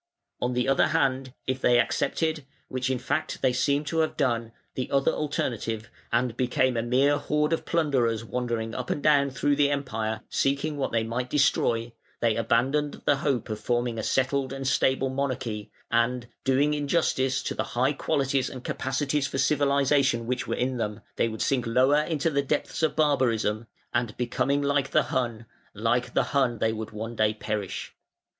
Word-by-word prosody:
On 125 Hz, 0 st, 0 dB
the 125 Hz, +1 st, 0 dB
other 135 Hz, 0 st, +4 dB
hand, 135 Hz, -4 st, 0 dB
if 130 Hz, 0 st, -2 dB
they 120 Hz, 0 st, +4 dB
accepted 155 Hz, +5 st, 0 dB, 0.3 s
(which 130 Hz, 0 st, -2 dB
in 130 Hz, -, +1 dB
fact 140 Hz, +5 st, -3 dB
they 130 Hz, -1 st, +3 dB
seem 140 Hz, +3 st, +1 dB
to 160 Hz, +2 st, -2 dB
have 160 Hz, -, 0 dB
done) 115 Hz, -5 st, 0 dB, 0.2 s
the 130 Hz, -, -3 dB
other 135 Hz, -1 st, +2 dB
alternative, 115 Hz, -6 st, -3 dB, 0.2 s
and 120 Hz, 0 st, +1 dB
became 125 Hz, +1 st, +1 dB
a 115 Hz, -, +1 dB
mere 135 Hz, +5 st, +3 dB
horde 150 Hz, +2 st, 0 dB
of 165 Hz, -, -2 dB
plunderers 125 Hz, -9 st, +1 dB
wandering 115 Hz, -2 st, -2 dB
up 125 Hz, 0 st, -4 dB
and 145 Hz, -, -2 dB
down 140 Hz, -2 st, +4 dB
through 145 Hz, +2 st, +1 dB
the 145 Hz, 0 st, +3 dB
Empire, 110 Hz, -6 st, -2 dB
seeking 140 Hz, +3 st, 0 dB
what 140 Hz, -2 st, -2 dB
they 115 Hz, -1 st, +1 dB
might 120 Hz, +3 st, -3 dB
destroy, 120 Hz, -4 st, +1 dB, 0.3 s
they 115 Hz, -2 st, +2 dB
abandoned 130 Hz, +6 st, 0 dB
the 145 Hz, -, +4 dB
hope 135 Hz, -5 st, -1 dB
of 110 Hz, -, -3 dB
forming 120 Hz, 0 st, -1 dB
a -, -, -3 dB
settled 130 Hz, +2 st, +1 dB
and 135 Hz, -1 st, -4 dB
stable 130 Hz, 0 st, +2 dB
monarchy, 130 Hz, -6 st, -3 dB, 0.2 s
and, 120 Hz, +1 st, +1 dB, 0.2 s
doing 140 Hz, +3 st, +3 dB
injustice 140 Hz, -3 st, +1 dB
to -, -, -2 dB
the -, -, -1 dB
high 130 Hz, +4 st, +3 dB
qualities 135 Hz, -3 st, 0 dB
and 130 Hz, -1 st, -9 dB
capacities 135 Hz, +1 st, -1 dB
for -, -, -4 dB
civilisation 140 Hz, -4 st, +2 dB
which 125 Hz, +1 st, -2 dB
were -, -, -1 dB
in 125 Hz, +1 st, -1 dB
them, 105 Hz, -3 st, -3 dB, 0.2 s
they -, -, +2 dB
would 110 Hz, -1 st, -3 dB
sink 125 Hz, -4 st, 0 dB
lower 130 Hz, +5 st, +4 dB
into 160 Hz, 0 st, -1 dB
the 140 Hz, -1 st, +2 dB
depths 145 Hz, +3 st, -2 dB
of 160 Hz, -, +1 dB
barbarism, 115 Hz, -7 st, +1 dB, 0.3 s
and 115 Hz, -3 st, -1 dB
becoming 130 Hz, +3 st, 0 dB
like 140 Hz, -1 st, +1 dB
the -, -, +3 dB
Hun, 120 Hz, -3 st, -1 dB, 0.3 s
like -, -, 0 dB
the -, -, +4 dB
Hun 130 Hz, -4 st, +2 dB
they 110 Hz, +1 st, +1 dB
would 110 Hz, -1 st, -5 dB
one 110 Hz, +2 st, -6 dB
day 110 Hz, -1 st, +2 dB
perish. 105 Hz, -3 st, -4 dB
130 Hz, 180 wpm, -26 LUFS, 115-140 Hz, 0.3 s, other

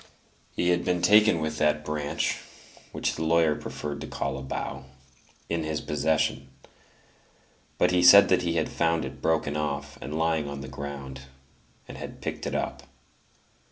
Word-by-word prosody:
He 90 Hz, -, +1 dB
had 90 Hz, 0 st, +2 dB
been 90 Hz, -1 st, 0 dB
taken 105 Hz, +1 st, +6 dB
with 80 Hz, 0 st, -3 dB
that 75 Hz, 0 st, +1 dB
branch 75 Hz, -1 st, -2 dB, 0.5 s
(which -, -, -1 dB
the 80 Hz, -, -4 dB
lawyer 80 Hz, -1 st, +3 dB
preferred 75 Hz, -1 st, -6 dB
to -, -, -6 dB
call 70 Hz, -1 st, -3 dB
a 65 Hz, -, -6 dB
bough) 65 Hz, 0 st, -5 dB, 0.6 s
in 85 Hz, -1 st, -1 dB
his 80 Hz, -1 st, -2 dB
possession; 75 Hz, -2 st, 0 dB, 1.3 s
but -, -, +3 dB
he 90 Hz, 0 st, +3 dB
said 100 Hz, +3 st, +9 dB
that 90 Hz, -1 st, +3 dB
he 85 Hz, -2 st, -1 dB
had 80 Hz, -, +1 dB
found 85 Hz, -1 st, 0 dB
it -, -, -9 dB
broken 80 Hz, -2 st, 0 dB
off 75 Hz, -1 st, -3 dB
and 75 Hz, +4 st, -5 dB
lying 80 Hz, -2 st, 0 dB
on 70 Hz, -1 st, -6 dB
the 65 Hz, -, -7 dB
ground, 70 Hz, -1 st, -7 dB, 0.6 s
and -, -, -9 dB
had -, -, -8 dB
picked -, -, -5 dB
it -, -, -3 dB
up. -, -, -3 dB
75 Hz, 165 wpm, -27 LUFS, 70-85 Hz, 1.3 s, said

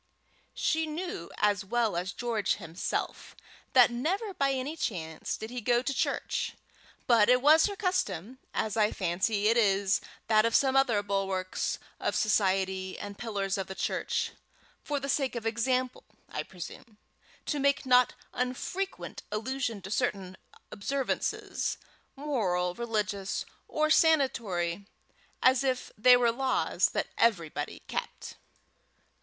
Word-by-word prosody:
She 320 Hz, 0 st, +1 dB
knew 310 Hz, -, -5 dB
as 205 Hz, -1 st, +2 dB
well 225 Hz, 0 st, 0 dB
as 180 Hz, +3 st, -2 dB
George 220 Hz, 0 st, 0 dB
himself 170 Hz, -2 st, -4 dB, 0.4 s
that 250 Hz, -2 st, +7 dB
never 380 Hz, -, -1 dB
by 275 Hz, -5 st, +1 dB
any 270 Hz, +3 st, -2 dB
chance 160 Hz, -, -3 dB
did 220 Hz, +1 st, -7 dB
he 250 Hz, -1 st, -4 dB
go 240 Hz, +2 st, +2 dB
to 275 Hz, -, -1 dB
church; -, -, -1 dB, 0.5 s
but 230 Hz, -3 st, +5 dB
it 250 Hz, 0 st, +6 dB
was 310 Hz, +6 st, +6 dB
her 405 Hz, -, -4 dB
custom, 260 Hz, -, -2 dB
as 215 Hz, -, -1 dB
I 215 Hz, -1 st, +3 dB
fancy 195 Hz, +4 st, 0 dB
it 230 Hz, +2 st, +4 dB
is 200 Hz, -2 st, +3 dB, 0.2 s
that 215 Hz, -1 st, +4 dB
of 230 Hz, 0 st, +1 dB
some 265 Hz, -1 st, +4 dB
other 240 Hz, -7 st, +3 dB
bulwarks 195 Hz, -2 st, -1 dB, 0.2 s
of -, -, -1 dB
society 190 Hz, -3 st, +1 dB
and 205 Hz, 0 st, -7 dB
pillars 200 Hz, -4 st, -2 dB
of 190 Hz, -, -3 dB
the 190 Hz, -, -7 dB
church, -, -, -1 dB, 0.5 s
"for 290 Hz, -1 st, -1 dB
the 275 Hz, -, -5 dB
sake 270 Hz, -2 st, 0 dB
of 230 Hz, -1 st, -4 dB
example," 250 Hz, +3 st, 0 dB, 0.3 s
I -, -, -3 dB
presume, 200 Hz, +4 st, -10 dB, 0.5 s
to 295 Hz, -, -1 dB
make 280 Hz, 0 st, +2 dB
not 250 Hz, -1 st, +5 dB, 0.2 s
unfrequent 255 Hz, +10 st, -3 dB
allusion 225 Hz, -1 st, -2 dB
to 195 Hz, -, -7 dB
certain 195 Hz, -6 st, -1 dB, 0.4 s
observances, 270 Hz, +6 st, -2 dB, 0.4 s
moral, 200 Hz, -12 st, 0 dB
religious, 210 Hz, -3 st, -2 dB, 0.2 s
or 310 Hz, 0 st, +1 dB
sanatory 205 Hz, -, +2 dB, 0.6 s
as 260 Hz, +1 st, +5 dB
if 255 Hz, -2 st, -1 dB
they 250 Hz, +3 st, +7 dB
were 240 Hz, -1 st, +3 dB
laws 260 Hz, +2 st, +1 dB
that -, -, -2 dB
everybody 165 Hz, -10 st, 0 dB
kept. -, -, -5 dB
230 Hz, 135 wpm, -29 LUFS, 195-265 Hz, 0.6 s, that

